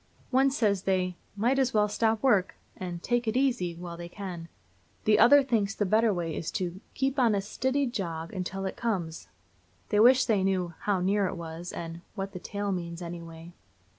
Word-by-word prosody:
One 265 +1 +4
says 210 -8 +1
they 185 -2 0 0.2
"might 240 +6 +2
as 260 -3 +1
well 210 0 +4
stop 220 +2 0
work" 205 -9 +3 0.2
and 175 -2 -6
"take 240 -1 0
it 220 +3 +1
easy" 240 -11 +1
while 170 0 -7
they 170 0 -7
can. 180 -4 -7 0.6
The 215 - +5
other 280 +5 +8
thinks 215 -6 0
the 205 - 0
better 220 +3 +3
way 170 -4 -2
is 160 - -3
to 180 +1 -3
"keep 270 +1 0
on 235 -4 +4
a - - +1
stiddy 260 +7 0
jog 170 -9 -4
until 195 0 -4
it 190 - -3
comes." 180 -9 -3 0.6
They 210 - +2
wish 255 +3 +6
they 210 -5 +2
knew 185 -3 0
"how 200 -3 0
near 195 +1 +2
it 180 - -5 0.2
is," 175 +1 -6
and 165 0 -6
"what 195 -1 -4
the 180 - -7
tail 205 +2 -3
means 170 -1 -4
anyway." 170 0 -8
195 Hz, 195 wpm, -28 LUFS, 175-230 Hz, 0.6 s, other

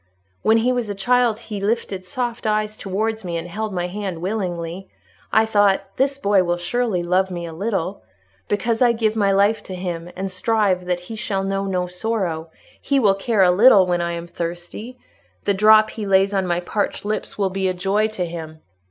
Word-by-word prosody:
When 220 +1 +4
he 235 +3 +2
was 245 -4 -2
a 205 - -3
child 240 +2 +2
he 215 -3 -7
lifted 200 -3 -2
soft 240 +2 -3
eyes 215 0 0
towards 220 +3 -2
me, 170 -2 -3
and 165 +1 -5
held 215 +5 -4
my 175 -2 -2
hand 190 -2 -4
willingly: 180 -2 -3 0.4
I 220 0 +4
thought, 200 -2 +2
this 275 +1 +1
boy 200 -7 +3
will 175 0 0
surely 200 0 -1
love 185 +2 +2
me 175 -2 -5
a 165 - -7
little: 195 0 -2 0.5
because 225 +3 0
I 240 -2 +5
give 220 -1 0
my 200 -2 +2
life 200 +3 +3
to 185 - -6
him 175 -2 -5
and 190 +1 -4
strive 185 -1 +1
that 180 -1 -1
he 200 +6 -8
shall 195 -2 -2
know 195 0 -1
no 185 -2 -1
sorrow, 180 -3 -2 0.3
he 275 -1 +1
will 205 -6 +4
care 195 +1 +1
a 180 - +5
little 200 0 +7
when 175 -1 0
I 170 0 -1
am 170 0 -5
thirsty—the 175 - -6
drop 215 +2 +6
he 215 -3 -5
lays 195 +1 +3
on 190 -2 0
my 175 0 0
parched 205 +3 -2
lips 215 +1 -3
will 195 -2 0
be 190 0 -1
a 185 - 0
joy 200 +4 +1
to 215 -5 -3
him... 160 -2 -8
195 Hz, 200 wpm, -21 LUFS, 180-220 Hz, 0.5 s, little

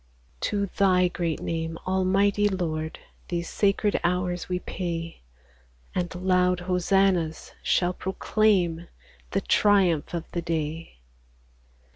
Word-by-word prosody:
^3 - - -33
To 200 - 0
Thy 185 -2 +3
great 170 -3 -2
name, 165 0 -3
Almighty 195 +2 +2
Lord, 160 -4 -3 0.3
These 170 -1 -3
sacred 205 +1 +1
hours 180 0 -1
we 180 - 0
pay; 170 -2 -5 0.7
And 180 0 -2
loud 180 0 +2
hosannas 180 -2 +1
shall 180 0 +2
proclaim 185 -3 +1 0.4
The 195 - 0
triumph 185 -7 +3
of 170 - -2
the 170 - -2
day. 160 - -4
180 Hz, 110 wpm, -26 LUFS, 170-190 Hz, 0.7 s, Thy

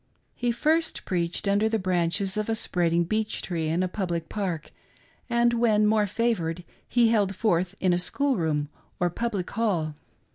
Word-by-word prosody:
He 240 0 0
first 315 +7 0
preached 175 +1 -1
under 205 +2 +3
the 225 - +1
branches 185 0 0
of 215 +1 -1
a 225 - +1
spread 175 -5 0
ing 170 +1 +3
beech 215 +5 -2
tree 165 -3 -2
in 165 +4 +1
a - - +1
public 175 -4 -3
park, 180 -7 -3 0.6
and 235 0 +3
when 220 -3 +3
more 210 -1 +3
favored 180 -6 -1 0.2
he 235 -2 +4
held 205 -4 +2
forth 185 -3 +1
in 185 -2 +2
a 175 - +2
school 275 +9 0
room 155 -5 0 0.3
or 175 -1 +1
public 205 -2 -3
hall. 180 -9 0
195 Hz, 175 wpm, -26 LUFS, 175-225 Hz, 0.6 s, he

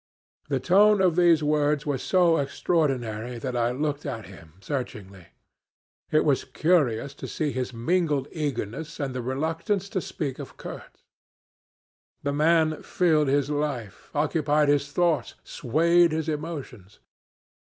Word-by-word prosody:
The 135 -2 +1
tone 200 +8 +5
of 185 -4 +3
these 170 -3 +4
words 150 0 +1
was 140 -3 -1
so 175 -3 +3
extraordinary 125 -6 -1
that 125 +2 -4
I 120 -1 +1
looked 145 +3 -2
at 115 -7 -5
him 85 -5 -14
searchingly. 100 - -6 0.8
It 155 - +3
was 140 -3 +2
curious 140 -3 +1
to - - -8
see 150 -2 -2
his 130 -1 -3
mingled 145 +3 0
eagerness 150 - -4
and 135 -3 -3
reluctance 160 - -2
to 190 -5 -2
speak 140 -6 -4
of - - -9
Kurtz. - - -10 1.2
The 140 0 -1
man 155 +1 +2
filled 155 -5 +2
his 140 +1 +1
life, 145 -8 -3
occupied 150 0 +2
his 145 0 +1
thoughts, 170 -1 +1
swayed 165 +5 +2
his 160 0 -2
emotions. 145 - -6
145 Hz, 130 wpm, -26 LUFS, 130-160 Hz, 1.2 s, tone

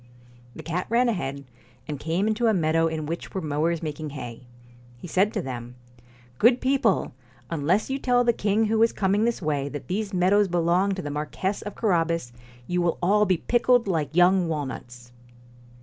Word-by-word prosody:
The 160 - -9
cat 170 +3 -3
ran 240 +2 +3
ahead, 140 -9 -3 0.4
and 145 -3 -5
came 165 +6 -1
into 220 +2 +1
a 220 - +3
meadow 165 -1 +2
in 160 -1 -3
which 165 +5 -6
were - - 0
mowers 160 +2 -1
making 155 0 -4
hay. 120 -1 -8 0.5
He 125 - -9
said 190 +5 +2
to 205 - -1
them: 120 -1 -7 0.3
' 120 0 -27
Good 240 +3 +5
people! 260 - +1 0.4
unless 170 - 0
you 270 - -1
tell 245 -2 +2
the 235 -1 +3
king 215 +1 +1
who 220 +1 +1
is 230 - +4
coming 200 +2 +1
this 235 -5 -1
way 145 -2 -1
that 145 +4 -8
these 205 +2 -2
meadows 195 +2 +3
belong 175 +3 +1
to 185 - -5
the 145 - -4
Marquess 155 +7 -3
of 205 - -7
Carabas, 165 - 0 0.3
you 180 +4 -1
will 175 -1 0
all 210 +3 +3
be 185 -1 +2
pickled 240 +4 +2
like 160 -4 -1
young 180 0 +4
walnuts.' 125 -5 -6
175 Hz, 185 wpm, -25 LUFS, 150-210 Hz, 0.5 s, Good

